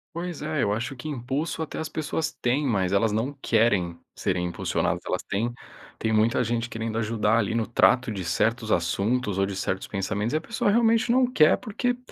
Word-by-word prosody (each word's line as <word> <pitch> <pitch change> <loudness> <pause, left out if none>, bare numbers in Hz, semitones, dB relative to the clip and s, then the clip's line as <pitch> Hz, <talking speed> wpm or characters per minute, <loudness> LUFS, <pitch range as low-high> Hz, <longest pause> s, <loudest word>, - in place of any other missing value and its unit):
Pois 170 -3 -4
é, 155 -1 -1
eu 100 - +1
acho 120 +6 -2
que 140 +5 -8
impulso 145 +5 -2
até 155 - -6
as 160 0 -3
pessoas 155 +1 -2
têm, 135 +4 0
mas 95 -4 +1
elas 105 +2 +3
não 115 +7 -1
querem 100 -7 +2 0.2
serem 90 -2 -1
impulsionadas. 85 - -1
Elas - - -1
têm 115 +5 -1 0.5
tem 110 0 -1
muita 115 +4 +3
gente 115 +1 -1
querendo 115 0 -3
ajudar 110 0 +1
ali 110 +1 0
no 115 -2 +1
trato 120 +1 +3
de 95 -3 -4
certos 110 +6 0
assuntos 100 +4 0
ou 95 - +3
de 100 - -5
certos 95 0 -2
pensamentos, 105 +4 -2
e - - +4
a - - -3
pessoa 230 +2 -1
realmente 230 +1 +3
não 255 +1 +4
quer 155 -9 +5
porque 245 +2 -2
115 Hz, 200 wpm, -26 LUFS, 105-155 Hz, 0.5 s, quer